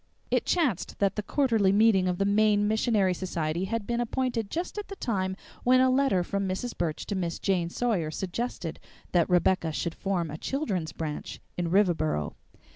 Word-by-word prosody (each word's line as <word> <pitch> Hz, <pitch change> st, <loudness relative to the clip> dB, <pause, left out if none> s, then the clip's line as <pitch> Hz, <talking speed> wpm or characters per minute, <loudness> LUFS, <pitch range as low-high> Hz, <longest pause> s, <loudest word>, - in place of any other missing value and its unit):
It -, -, +2 dB
chanced 290 Hz, -, 0 dB
that 200 Hz, -1 st, +1 dB
the 210 Hz, -, -1 dB
quarterly 225 Hz, -4 st, +2 dB
meeting 200 Hz, -2 st, +4 dB
of 180 Hz, -1 st, 0 dB
the 195 Hz, -, +1 dB
Maine 205 Hz, 0 st, +3 dB
Missionary 215 Hz, -3 st, +2 dB
Society 170 Hz, -1 st, -2 dB
had 225 Hz, +1 st, -2 dB
been 235 Hz, +2 st, -1 dB
appointed 240 Hz, -3 st, -1 dB
just 355 Hz, +5 st, -3 dB
at 415 Hz, -, -6 dB
the 395 Hz, -, -7 dB
time 190 Hz, -, -1 dB, 0.3 s
when 255 Hz, +1 st, +5 dB
a 260 Hz, 0 st, +5 dB
letter 260 Hz, -9 st, +3 dB
from 200 Hz, +2 st, -2 dB
Mrs. 225 Hz, +6 st, -3 dB
Burch 160 Hz, -3 st, -2 dB
to -, -, -3 dB
Miss 170 Hz, -3 st, -2 dB
Jane 180 Hz, -4 st, 0 dB
Sawyer 195 Hz, -7 st, 0 dB
suggested 185 Hz, 0 st, -4 dB, 0.3 s
that 175 Hz, -1 st, +3 dB
Rebecca 180 Hz, -1 st, +3 dB
should 165 Hz, +2 st, -2 dB
form 175 Hz, -5 st, -2 dB
a 155 Hz, -, -6 dB
children's 195 Hz, -, -2 dB
branch 155 Hz, -2 st, -5 dB, 0.2 s
in 175 Hz, -1 st, -1 dB
Riverboro. 165 Hz, -, +2 dB
195 Hz, 180 wpm, -28 LUFS, 175-230 Hz, 0.3 s, when